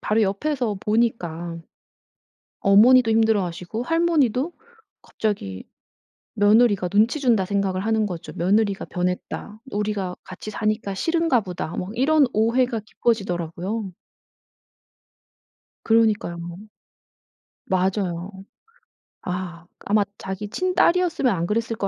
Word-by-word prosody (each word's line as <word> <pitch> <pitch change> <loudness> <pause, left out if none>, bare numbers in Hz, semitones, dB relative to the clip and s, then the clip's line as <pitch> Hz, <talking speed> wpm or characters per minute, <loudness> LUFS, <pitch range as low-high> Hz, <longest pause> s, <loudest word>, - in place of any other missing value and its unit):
바로 220 +1 +1
옆에서 225 +3 -1
보니까 175 -7 -1 1.0
어머니도 225 +4 +6
힘들어하시고 215 -2 0
할머니도 320 -3 +1 0.5
갑자기 100 - -3 0.7
며느리가 205 -2 +4
눈치 220 - +2
준다 230 -8 +3
생각을 195 -1 -1
하는 220 -1 +1
거죠. 175 -4 -7
"며느리가 200 +3 +1
변했다. 180 +4 -4
우리가 205 -3 -2
같이 185 +3 -8
사니까 215 -1 -2
싫은가 325 - +1
보다." 180 -6 -5
뭐 185 - -4
이런 290 +3 +4
오해가 230 +1 +1
깊어지더라고요. 195 -2 -2 1.9
그러니까요. 220 -5 +2 1.3
맞아요. 185 -1 -1 0.9
아. 180 -2 -5 0.2
아마 210 0 +3
자기 190 +2 -6
친딸이었으면 355 - +2
안 170 -2 -1
그랬을 225 +1 -1
거 200 - -1
210 Hz, 265 characters per minute, -23 LUFS, 185-235 Hz, 1.9 s, 어머니도